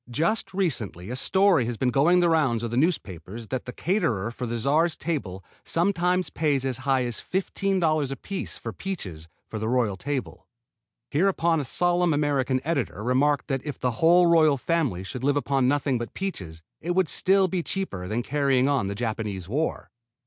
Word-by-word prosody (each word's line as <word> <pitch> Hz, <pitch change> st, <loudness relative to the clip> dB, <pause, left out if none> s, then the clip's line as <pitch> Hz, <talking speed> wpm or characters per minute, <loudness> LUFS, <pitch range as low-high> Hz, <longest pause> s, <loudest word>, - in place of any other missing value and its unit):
Just 165 Hz, -, 0 dB
recently 120 Hz, -, -2 dB
a -, -, -3 dB
story 190 Hz, -2 st, +3 dB
has 120 Hz, -2 st, -3 dB
been 125 Hz, +1 st, +1 dB
going 170 Hz, +8 st, +4 dB
the 175 Hz, -, +3 dB
rounds 135 Hz, -8 st, +2 dB
of 115 Hz, -, -3 dB
the -, -, -2 dB
newspapers 115 Hz, -, -2 dB
that 130 Hz, -1 st, -3 dB
the 125 Hz, -, -5 dB
caterer 140 Hz, -, -1 dB
for 125 Hz, +1 st, -5 dB
the 120 Hz, +1 st, -2 dB
Czar's 155 Hz, +7 st, +2 dB
table 105 Hz, -, -4 dB, 0.2 s
sometimes 180 Hz, -1 st, +1 dB
pays 145 Hz, -4 st, 0 dB
as 130 Hz, -2 st, -2 dB
high 130 Hz, -1 st, +1 dB
as 120 Hz, -1 st, -3 dB
$15 180 Hz, -6 st, 0 dB
apiece 185 Hz, +7 st, -4 dB
for -, -, -6 dB
peaches 95 Hz, -, -5 dB, 0.2 s
for 110 Hz, -, -5 dB
the 110 Hz, +1 st, -2 dB
royal 120 Hz, -5 st, +1 dB
table. 130 Hz, +6 st, -5 dB, 0.6 s
Hereupon 170 Hz, 0 st, +2 dB
a -, -, -1 dB
solemn 175 Hz, +3 st, +1 dB
American 135 Hz, -3 st, +1 dB
editor 140 Hz, -, -2 dB
remarked 140 Hz, +4 st, +2 dB
that 135 Hz, -2 st, -2 dB
if 145 Hz, -2 st, -6 dB
the 125 Hz, -, 0 dB
whole 175 Hz, +2 st, +6 dB
royal 160 Hz, -4 st, +5 dB
family 135 Hz, -, -1 dB
should 125 Hz, +6 st, -7 dB
live 145 Hz, +1 st, +2 dB
upon 135 Hz, -2 st, +1 dB
nothing 140 Hz, -2 st, +1 dB
but 120 Hz, -, -6 dB
peaches 90 Hz, -, -5 dB, 0.2 s
it 175 Hz, +2 st, -2 dB
would 185 Hz, -2 st, +3 dB
still 190 Hz, +4 st, +3 dB
be 185 Hz, -1 st, -1 dB
cheaper 165 Hz, -, -4 dB
than 115 Hz, +5 st, -2 dB
carrying 135 Hz, -2 st, +2 dB
on 140 Hz, -8 st, +1 dB
the 100 Hz, -, -3 dB
Japanese 110 Hz, -5 st, -3 dB
war. 150 Hz, +10 st, -2 dB
140 Hz, 180 wpm, -25 LUFS, 120-170 Hz, 0.6 s, whole